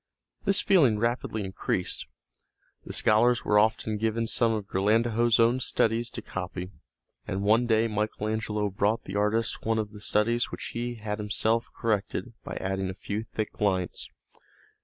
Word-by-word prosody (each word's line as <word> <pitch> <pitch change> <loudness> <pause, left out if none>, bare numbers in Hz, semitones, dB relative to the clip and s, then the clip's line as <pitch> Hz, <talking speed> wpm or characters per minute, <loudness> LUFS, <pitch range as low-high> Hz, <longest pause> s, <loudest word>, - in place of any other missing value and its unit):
This 200 0 +4
feeling 145 - +4
rapidly 115 -1 -1
increased. 95 -1 -2 0.8
The - - -6
scholars 115 +2 +3
were 105 0 +4
often 110 0 +1
given 115 +1 0
some 115 0 +2
of 110 -3 -2
Ghirlandajo's 115 +4 +2
own 115 +2 +4
studies 115 -1 +1
to - - -7
copy, 90 0 -5 0.6
and 95 +1 -2
one 110 +4 +4
day 110 0 +3
Michael 105 0 -2
Angelo 105 -2 -1
brought 105 +4 0
the 95 - -7
artist 105 +2 0
one 110 0 +1
of 105 -2 -2
the 105 -1 -11
studies 115 +3 +1
which - - -6
he 120 +1 -3
had 105 -1 -4
himself 110 +2 0
corrected 110 +2 -1
by - - -6
adding 95 0 -2
a 95 - -5
few 100 +1 -4
thick 110 -1 -5
lines. 95 -4 0
110 Hz, 160 wpm, -27 LUFS, 105-115 Hz, 0.8 s, This